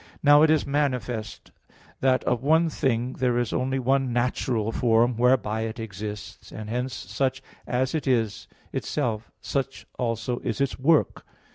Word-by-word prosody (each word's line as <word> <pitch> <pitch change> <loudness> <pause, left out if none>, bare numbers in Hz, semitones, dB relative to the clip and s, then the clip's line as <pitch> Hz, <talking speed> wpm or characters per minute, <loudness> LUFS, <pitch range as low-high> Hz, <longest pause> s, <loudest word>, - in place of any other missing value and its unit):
Now 145 0 +7
it 155 - +6
is 155 -1 +3
manifest 125 -6 -2 0.5
that 130 -1 +2
of 120 -1 0
one 160 +4 +3
thing 125 -2 0
there 125 -1 +2
is 120 -3 -1
only 130 +1 0
one 135 0 +1
natural 120 -2 0
form 120 0 +3
whereby 115 -3 +2
it 110 +1 -4
exists; 105 -1 -7
and 110 0 -7
hence 125 +1 -2
such 135 -1 -2 0.2
as 130 +1 0
it 155 -3 -2
is 115 -5 0 0.3
itself, 115 -7 -2
such 135 +2 -3
also 120 +1 -1
is - - -3
its 140 -1 -1
work. 155 +3 +2
125 Hz, 150 wpm, -25 LUFS, 115-135 Hz, 0.5 s, Now